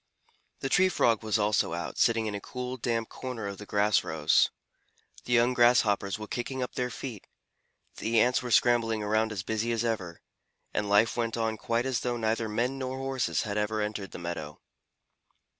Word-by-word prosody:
The 135 - -2
Tree 185 +4 +4
Frog 115 - +2
was 110 -1 0
also 105 0 +1
out, - - -5
sitting 115 -1 +3
in 105 - -2
a 100 - -4
cool, 125 +2 -5
damp 115 -2 -1
corner 125 -5 -6
of 100 -1 -5
the 105 - -9
grass 105 0 +2
rows. 80 -1 +3 0.8
The 125 - -1
young 120 +1 +4
Grasshoppers 115 -4 +3
were 110 - -6
kicking 125 +4 -3
up 125 - -5
their 125 0 -1
feet, 120 -5 -7 0.7
the 115 0 +1
Ants 125 +3 +3
were 125 - -5
scrambling 115 -2 +3
around 110 +1 +1
as 100 -4 -4
busy 110 +3 -1
as 115 0 0
ever, 95 -8 -3 0.5
and 105 -1 -1
life 105 +3 +4
went 115 -1 -1
on 110 -1 0
quite 115 +3 -1
as 130 -2 0
though 120 -1 -2
neither 110 0 -1
men 125 +5 -1
nor 130 0 -3
Horses 135 -1 -1
had 105 -1 -2
ever 105 +1 -1
entered 105 -2 -3
the - - -9
meadow. 85 -3 -6
115 Hz, 190 wpm, -28 LUFS, 105-120 Hz, 0.8 s, Tree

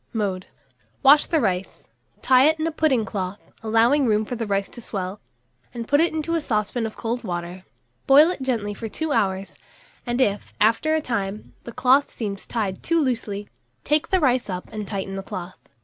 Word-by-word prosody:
Mode. 195 -4 -2 0.6
Wash 285 +2 +7
the 325 - +2
rice, 190 -5 -2 0.4
tie 260 0 +6
it 315 +1 +3
in 315 - 0
a 330 - 0
pudding 285 -8 +1
cloth, 195 -1 -4 0.2
allowing 230 +5 +3
room 215 0 +2
for 245 - -6
the 230 -2 -3
rice 195 -1 0
to 240 - -11
swell, 195 -2 -5 0.5
and 230 -1 -5
put 285 +2 +4
it 340 - +3
into 315 +1 -2
a 330 - +1
saucepan 225 -1 -1
of 215 - -10
cold 235 +2 -3
water; 175 -1 -5 0.4
boil 295 +5 +7
it 360 - -6
gently 225 -6 -1
for 225 +2 -6
2 315 +7 -3
hours, 195 -6 0 0.5
and 240 +1 -2
if, 205 -6 0
after 230 +9 +3
a 315 - +1
time, 210 -3 -3
the 235 - -7
cloth 255 +4 +3
seems 200 -4 -5
tied 205 -5 -2
too 335 0 +1
loosely, 225 -7 -2 0.4
take 300 +3 +1
the 375 - +3
rice 255 - +1
up 180 -1 -5
and 210 -2 -5
tighten 195 -1 -4
the - - -3
cloth. 185 -1 -7
225 Hz, 195 wpm, -23 LUFS, 200-275 Hz, 0.6 s, Wash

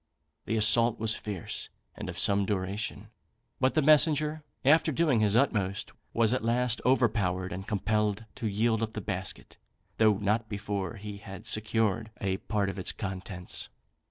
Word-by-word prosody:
The 115 - -1
assault 115 +2 +5
was 110 0 +3
fierce, 100 -6 -5 0.3
and - - -6
of - - -7
some 100 0 +4
duration; 100 +1 -3 0.5
but 130 0 +2
the 155 - +3
messenger, 155 +1 +5 0.2
after 155 +3 +5
doing 145 -4 +2
his 105 -1 +2
utmost, 105 -7 0 0.2
was 115 0 +3
at 130 - -1
last 120 +1 +1
overpowered 100 -8 +1
and 95 +2 -7
compelled 105 +1 0
to 120 - -2
yield 110 +2 +1
up 110 -1 -2
the - - -4
basket, 95 -1 -6 0.4
though 110 -3 +4
not 105 +2 0
before 100 0 -3
he 105 -1 -8
had 95 -2 -10
secured 110 0 0
a 95 -2 -1
part 105 0 -1
of 95 0 -4
its 95 - +1
contents. 95 -2 -6
110 Hz, 155 wpm, -29 LUFS, 100-115 Hz, 0.5 s, assault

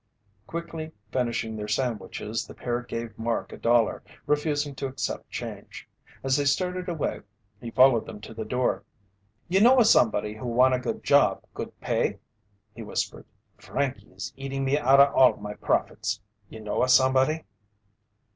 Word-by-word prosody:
Quickly 165 -1 -6 0.2
finishing 115 -3 -1
their 105 -1 -5
sandwiches, 110 -2 -2
the - - -11
pair 120 0 -2
gave 115 -1 -6
Mark 115 +1 -2
a - - -8
dollar, 115 -1 +2 0.2
refusing 145 -1 0
to 135 0 -4
accept 130 - -4
change. - - -7 0.4
As 135 0 +2
they 145 - +2
started 180 +5 0
away, 150 -10 -2 0.4
he 120 - -6
followed 130 -1 +5
them 105 - -8
to 110 - -9
the 110 0 -5
door. 125 +3 -1 0.6
"You 190 +3 +3
know 250 +4 +7
a 235 - +6
somebody 105 - +3
who 110 +3 -7
wanta 125 +2 +4
good 125 -2 -4
job, - - +4
good - - -7
pay?" - - 0 0.6
he 115 - -9
whispered. 110 - -4 0.3
"Frankey 140 -2 -3
is 95 +2 -7
eating 135 0 -4
me 135 +1 +2
outta 140 -1 +5
all 130 -3 +5
my 105 0 -6
profits. 110 +1 -1 0.3
You 110 - -10
know 105 -1 -2
a 130 - +2
somebody?" 130 +4 +4
130 Hz, 155 wpm, -26 LUFS, 115-145 Hz, 0.6 s, know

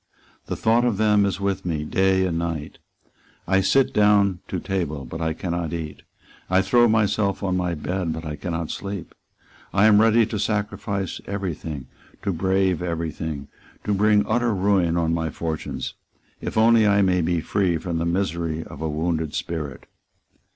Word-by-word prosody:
The - - -2
thought 115 +2 +3
of 120 -5 +1
them 105 -1 +4
is 95 - -2
with 100 -1 -1
me 80 -4 -2
day 95 +4 +2
and 85 -2 -1
night. 80 -3 -4 0.7
I 95 0 +3
sit 135 +8 +3
down 100 -3 +4
to - - -3
table; 75 -8 -3
but 80 +7 -7
I 80 -1 0
cannot 85 -1 -3
eat. 80 -3 -5 0.5
I 95 +1 +3
throw 120 +2 +4
myself 105 -2 +1
on 95 -2 0
my 90 -2 -1
bed; 90 +2 -2
but 80 +1 -5
I 75 -1 -4
cannot 85 -1 -4
sleep. 100 -4 -6 0.6
I 100 +2 +4
am 105 -1 +6
ready 115 +1 +5
to 105 -1 -4
sacrifice 100 -2 -2
every 100 -3 -2
thing, 75 -4 -7 0.4
to 100 - 0
brave 95 0 +1
every 85 -2 -2
thing, 75 -3 -5 0.4
to 105 - 0
bring 105 +1 +3
utter 120 0 +1
ruin 95 -3 +2
on 80 -1 +1
my 80 -1 -1
fortunes, 80 0 -4 0.5
if - - -4
only 110 -1 +5
I 100 0 +4
may 90 -1 +2
be 85 +1 +1
free 90 0 0
from 85 0 -3
the 85 - -1
misery 85 -3 -1
of - - -11
a 80 - -1
wounded 80 0 -1
spirit." 75 -5 -4
90 Hz, 175 wpm, -23 LUFS, 80-100 Hz, 0.7 s, am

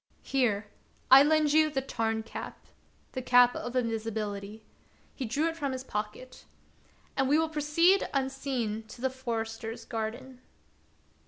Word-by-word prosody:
Here, 230 -6 +1 0.5
I 265 +1 +11
lend 305 0 +3
you 310 0 +5
the 280 -3 -1
Tarn 225 -3 -2
cap 225 - -8 0.2
" - - -36
(the 260 - -4
cap 245 -1 +5
of 245 +1 -5
invisibility), 220 -3 -3 0.2
— - - -34
he 265 - -4
drew 280 +8 0
it 330 - -2
from 285 -5 -2
his 260 0 -5
pocket, 215 +3 -6 0.3
— - - -33
"and 270 -1 +1
we 295 - +5
will 320 0 +1
proceed 320 +5 +3
unseen 265 -5 -2
to 230 - -12
the 265 +1 0
forester's 230 -2 -4
garden." 245 +3 -5
255 Hz, 155 wpm, -29 LUFS, 225-275 Hz, 0.5 s, I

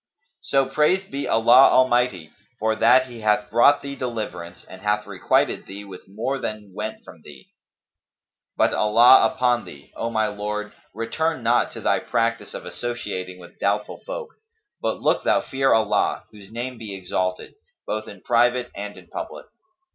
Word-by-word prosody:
So 135 -1 +2
praised 155 +8 +1
be 140 +1 -3
Allah 120 +4 +6
Almighty 120 -10 +2 0.3
for 110 0 0
that 125 +4 +5
He 120 -3 -11
hath 110 +3 +1
brought 140 +5 +5
thee 140 0 -5
deliverance 110 -9 -6
and 95 - -12
hath 105 0 0
requited - - 0
thee 100 +1 -8
with 95 -2 -12
more 115 +8 -3
than 105 -5 -6
went 105 +2 -5
from - - -14
thee! 70 -3 -14 1.1
But - - +3
Allah 115 +4 +6
upon 125 -2 +1
thee, 70 0 -13
O 115 - -3
my 110 -1 +1
lord, 105 0 -4 0.2
return 130 +5 -2
not 120 +1 +2
to - - -8
thy - - +2
practice 115 0 -2
of - - -7
associating 100 -7 -5
with 90 -1 -15
doubtful 100 +1 -1
folk; - - -6 0.5
but - - -1
look - - +2
thou - - +3
fear 135 0 0
Allah 110 -2 +2
(whose 105 -2 -14
name 120 +1 -5
be 105 -3 -7
exalted!) 90 0 -3 0.3
both 110 0 -4
in 100 -2 -11
private 120 +1 +2
and 105 0 -7
in - - -13
public." - - -7
115 Hz, 160 wpm, -23 LUFS, 105-125 Hz, 1.1 s, Allah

